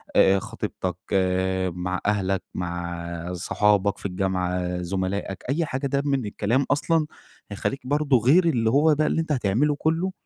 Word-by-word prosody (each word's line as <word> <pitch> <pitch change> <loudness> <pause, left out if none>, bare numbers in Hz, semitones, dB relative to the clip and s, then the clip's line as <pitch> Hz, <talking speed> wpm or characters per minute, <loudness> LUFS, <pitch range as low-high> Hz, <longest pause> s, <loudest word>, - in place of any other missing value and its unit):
آآ 95 0 +5
خطيبتك، - - -4 0.2
آآ، 95 0 +1
مع 90 +1 -3
أهلك، 95 -2 0
مع 85 0 -4
صُحابك 100 +2 +1
في - - -13
الجامعة، 90 -1 -1
زُملائك، 95 +2 -3
أي 160 +4 +1
حاجة 140 -1 -2
ده 140 +1 0
من 140 -4 0
الكلام 110 +6 0
أصلًا 155 +2 +2 0.5
هيخلّيك 130 +6 -3
برضه 145 -2 +3
غير 145 +11 +4
اللي 120 -9 +2
هو 150 +5 +4
بقى 155 +1 +1
اللي 165 - +1
أنت 160 - -4
هتعمله 130 +3 +1
كلّه 165 +5 0
100 Hz, 150 wpm, -24 LUFS, 90-140 Hz, 0.5 s, آآ